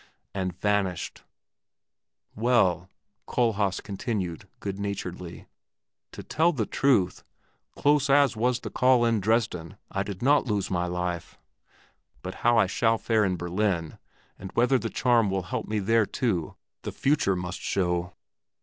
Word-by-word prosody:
and 95 -2 -3
vanished. 100 -3 -1 1.1
Well," 105 -6 +2 0.4
Kohlhaas 105 -6 +1
continued 100 - -4
good 100 -1 -5
naturedly, 90 -3 -5 0.7
"to - - -9
tell 165 +2 +2
the 120 -10 -1
truth, 120 -10 +1 0.5
close 145 -1 +2
as 140 -3 +4
was 120 +2 0
the - - -6
call 125 -2 +4
in 115 -2 +2
Dresden, 100 -4 0
I 100 - -1
did 100 +1 -5
not 145 0 +4
lose 105 -4 -1
my 90 -1 0
life; 90 -1 -4 0.9
but 95 +1 -5
how 120 0 +4
I - - +5
shall 115 +4 +1
fare 110 -1 +1
in 95 -2 0
Berlin 90 -2 -1 0.4
and 95 - -8
whether 125 +2 +3
the 115 - -3
charm 120 -4 +2
will 95 -1 -1
help 110 +5 -4
me 105 0 -1
out 100 - -5
there 115 -1 +3
too, 95 -11 -1 0.3
the - - -5
future 140 -9 +1
must 90 +1 -4
show." 90 -1 -1
100 Hz, 145 wpm, -27 LUFS, 90-120 Hz, 1.1 s, I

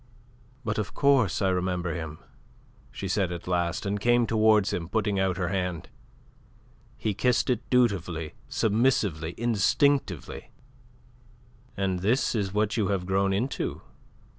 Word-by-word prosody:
"But 105 0 -1
of 105 - -4
course 130 - +3
I 95 - +3
remember 90 -2 -1
him," 80 -2 -6 0.7
she 100 - -6
said 95 -1 0
at 85 0 -7
last, 85 0 -1
and 100 +1 -1
came 120 +2 +3
towards 110 -2 +3
him, 85 -1 -3
putting 105 -1 0
out 95 -1 +1
her 90 -2 -1
hand. 90 -3 -3 1.1
He 110 - -1
kissed 125 +4 +1
it 120 -1 -3
dutifully, 90 -10 +1 0.2
submissively, 105 - +1
instinctively. 120 - +1 1.3
"And 95 -2 0
this 110 +9 +1
is 100 -4 -1
what 105 +2 0
you 105 -4 +1
have 95 -2 -1
grown 95 +1 +1
into?" 115 +8 -2
100 Hz, 135 wpm, -27 LUFS, 90-110 Hz, 1.3 s, course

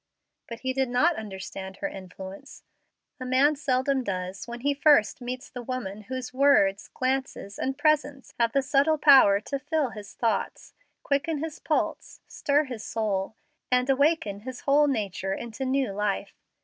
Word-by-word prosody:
But 230 -1 -8
he 260 0 -1
did 265 -1 0
not 305 +8 +3
understand 190 -3 -7
her 295 - -2
influence. 190 +2 -10 0.6
A - - -5
man 265 +4 +3
seldom 270 -2 0
does 185 -1 -4
when 240 0 -7
he 285 +2 +1
first 280 -6 +4
meets 250 +2 -5
the 245 - -8
woman 220 -5 -5
whose 255 +2 -5
words, 255 -8 +3
glances, 260 -6 -3
and 265 +1 -2
presence 290 -3 0
have 230 -1 +3
the 275 +2 +1
subtle 285 +3 +3
power 270 -9 +7
to 275 +5 -4
fill 290 -1 -1
his 210 -2 -10
thoughts, 230 -2 -2 0.3
quicken 295 +3 0
his 310 +1 -5
pulse, - - -2
stir 290 +1 +1
his 245 -6 -7
soul, 210 -2 -2 0.3
and 250 +1 +3
awaken 275 -7 +1
his 250 +4 -8
whole 290 +1 +4
nature 200 -6 -2
into 235 +3 -6
new 260 -3 0
life. 200 0 -2
255 Hz, 160 wpm, -26 LUFS, 210-280 Hz, 0.6 s, power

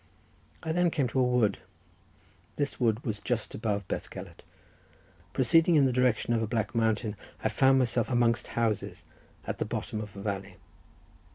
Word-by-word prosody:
I 160 - -2
then 175 +1 +3
came 150 -6 0
to 130 - 0
a - - +5
wood—this 125 +4 -3
wood 115 -1 +1
was 105 -4 -2
just 115 +1 -2
above 100 -3 -2
Bethgelert—proceeding 165 +6 -2
in 145 -3 +6
the 130 - +2
direction 125 -2 +2
of 115 - +1
a 110 - -1
black 110 0 -1
mountain, 110 -1 0 0.3
I - - +2
found 135 0 +4
myself 120 -3 +1
amongst 120 -2 +2
houses, 115 -4 -1 0.4
at - - -4
the - - 0
bottom 110 - -4
of 105 -1 -9
a 100 - -7
valley. 100 -2 -4
115 Hz, 155 wpm, -29 LUFS, 110-130 Hz, 0.4 s, in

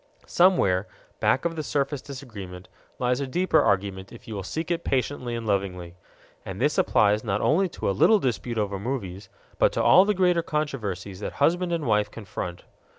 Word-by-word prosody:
Somewhere, 105 - +3 0.3
back 135 - +2
of 170 -1 -1
the 160 - -3
surface 145 -1 -2
disagreement, 105 -10 -9 0.3
lies 125 +1 0
a 140 - -2
deeper 180 +8 +2
agreement 95 -1 -3
if 115 - -13
you 110 - -6
will 100 - -4
seek 160 - -4
it 170 0 -1
patiently 130 -2 -1
and 115 -1 -5
lovingly. 95 -4 -2 0.5
And - - -7
this - - +1
applies 105 0 +3
not 105 -3 -1
only 180 - +2
to - - -5
a - - +3
little 215 - +5
dispute 120 - -2
over 100 -2 -1
movies, 100 -5 -5 0.3
but - - +4
to - - 0
all 185 - +7
the 210 0 +1
greater 180 -2 +3
controversies 105 - -3
that - - -5
husband 175 +1 +1
and 165 -3 -1
wife 105 -2 +2
confront. 90 -5 -7
120 Hz, 185 wpm, -25 LUFS, 100-155 Hz, 0.5 s, all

